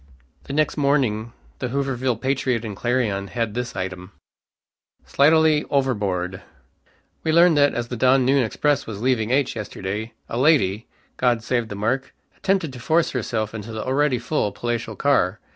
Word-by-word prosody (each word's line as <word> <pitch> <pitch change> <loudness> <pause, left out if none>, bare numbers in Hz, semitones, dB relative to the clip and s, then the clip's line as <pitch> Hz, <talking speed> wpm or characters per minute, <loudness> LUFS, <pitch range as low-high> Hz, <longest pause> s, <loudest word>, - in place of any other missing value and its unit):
The - - -6
next 155 +2 +1
morning 130 -6 +1 0.3
the 125 - -2
Hooverville 130 -2 -1
Patriot 130 -3 0
and 105 -2 -5
Clarion 110 -4 -1
had 115 0 -2
this 125 +1 -4
"item": 95 0 -5 0.9
SLIGHTUALLY 155 +1 +4
OVERBOARD. 100 -9 -1 0.8
"We 160 - +1
learn 170 +1 +6
that 145 -1 +3
as 120 0 -3
the 125 - -3
down 130 +2 +3
noon 135 0 +3
express 145 +5 0
was 105 -3 -6
leaving 120 -4 +1
H 135 0 +1
yesterday 105 +1 -5
a 115 - -3
lady! 125 -8 +3 0.3
(God 120 -3 +1
save 120 -1 0
the 105 - -6
mark) 115 +7 -2 0.2
attempted 190 -7 0
to 125 - -9
force 160 +7 +1
herself 110 -3 -2
into 110 0 -7
the 110 -1 -5
already 135 0 +2
full 115 -3 -1
palatial 120 +2 -3
car. 110 -8 +1
125 Hz, 160 wpm, -22 LUFS, 110-140 Hz, 0.9 s, learn